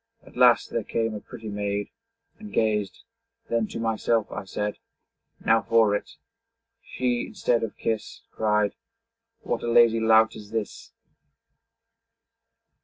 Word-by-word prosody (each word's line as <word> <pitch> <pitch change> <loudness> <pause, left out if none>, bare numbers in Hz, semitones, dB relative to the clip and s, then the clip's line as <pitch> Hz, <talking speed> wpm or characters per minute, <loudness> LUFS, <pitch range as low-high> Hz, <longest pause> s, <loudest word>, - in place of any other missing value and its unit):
At - - -17
last - - +5
there - - -1
came 115 -1 -1
a 105 - -5
pretty 115 +1 -10
maid, 100 0 -3 0.5
And 210 -1 -10
gazed; 105 -3 0 0.5
then 115 -2 +1
to - - -6
myself 115 -1 0
I - - -5
said, 105 +2 -3 0.7
'Now 115 0 +4
for 115 -2 +3
it!' - - -5 0.7
She, 125 -1 -1
instead 120 -1 0
of 115 - -4
kiss, 110 -2 -3
Cried, 105 -1 +1 0.7
'What - - -2
a 120 - -2
lazy 115 -1 +5
lout 110 0 +4
is 105 -1 -11
this!' 110 -1 -5
110 Hz, 130 wpm, -25 LUFS, 105-115 Hz, 0.7 s, last